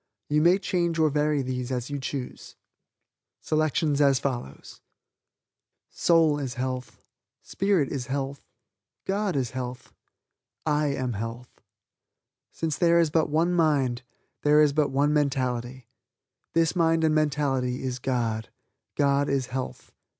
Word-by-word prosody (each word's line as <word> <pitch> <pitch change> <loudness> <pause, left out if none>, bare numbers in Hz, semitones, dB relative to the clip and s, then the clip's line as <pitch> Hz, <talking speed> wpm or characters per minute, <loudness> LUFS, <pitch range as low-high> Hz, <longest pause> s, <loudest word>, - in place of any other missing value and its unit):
You 150 +1 +3
may 175 +4 +5
change 170 -4 -1
or 155 -2 +3
vary 150 -1 +1
these 125 0 -4
as 125 +1 -3
you 145 - -2
choose: 130 -1 -6 0.8
Soul 155 0 0 2.8
is 135 -4 -4
health, 130 0 -5 0.4
spirit 195 -8 +1
is 130 -3 -4
health, 140 +1 -3 0.6
God 195 -1 -1
is 130 -4 -1
health, 125 -1 -6 0.7
I 150 -1 +1
am 130 -3 -2
health. 115 +4 -7 0.9
Since 160 -3 -3
there 170 -1 +4
is 165 -3 +2
but 160 0 +2
one 165 +4 +2
mind, 140 -8 +2 0.4
there 150 +1 +4
is 145 -2 +3
but 150 -1 +2
one 145 +2 +2
mentality. 130 -3 -1 0.7
This 165 +1 +2
mind 165 -2 +2
and 155 -1 +3
mentality 140 -5 0
is 130 -1 -3
God; 115 -4 -2 0.5
God 140 0 +2
is 135 -2 0
health. 130 -1 -5
140 Hz, 120 wpm, -26 LUFS, 130-155 Hz, 2.8 s, may